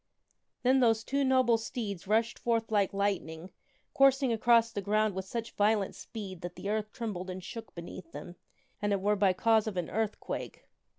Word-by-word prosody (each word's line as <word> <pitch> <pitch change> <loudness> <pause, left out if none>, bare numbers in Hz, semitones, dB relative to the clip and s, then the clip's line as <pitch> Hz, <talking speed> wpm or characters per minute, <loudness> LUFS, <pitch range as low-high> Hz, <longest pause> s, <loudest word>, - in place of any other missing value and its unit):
Then 260 +1 +4
those 225 -3 +3
two 280 +3 0
noble 255 -3 +3
steeds 210 -5 -5
rushed 225 +2 +1
forth 230 -2 0
like 205 -3 +2
lightning, 190 -4 -2 0.4
coursing 270 -2 +4
across 230 0 +4
the 205 - -3
ground 215 +1 +1
with 190 0 -4
such 230 +3 -4
violent 205 -1 +2
speed 195 -6 -8
that 175 0 -6
the 200 - -4
earth 215 0 -2
trembled 195 -6 -5
and 185 0 -6
shook 225 0 -8
beneath 170 0 -9
them, 150 +4 -9 0.5
an 205 0 +1
it 200 - +1
were 205 +2 +2
by 195 -2 +3
cause 220 +3 +3
of 205 -4 -3
an 175 -2 -2
earthquake. 220 0 -3
210 Hz, 180 wpm, -30 LUFS, 190-230 Hz, 0.5 s, Then